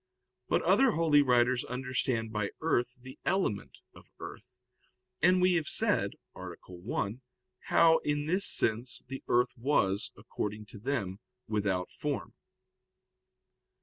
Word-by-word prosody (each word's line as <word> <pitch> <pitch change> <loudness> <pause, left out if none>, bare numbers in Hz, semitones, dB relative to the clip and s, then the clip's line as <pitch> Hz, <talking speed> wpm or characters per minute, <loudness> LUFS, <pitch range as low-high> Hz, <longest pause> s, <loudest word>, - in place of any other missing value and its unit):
But - - +2
other 265 -4 +4
holy 155 -3 +4
writers 125 -2 +3
understand 125 -3 -2
by 105 -1 -1
earth 125 -5 0
the 130 0 -11
element 105 - -1 0.2
of - - -17
earth, 125 0 -10 0.6
and 180 +3 +5
we 180 0 +4
have 160 -4 0
said - - +1 0.2
(A. - - -8 0.2
1) 100 +5 -4 0.4
how, 165 -1 +5
in 145 0 -1
this 185 +5 +2
sense, 115 +3 +2
the 135 +1 -6
earth 125 +1 +2
was, 110 -6 +1
according 105 +1 -5
to 105 - -9
them, 105 -6 -3 0.3
without 100 -4 -1
form. - - -4
125 Hz, 125 wpm, -30 LUFS, 105-145 Hz, 0.6 s, and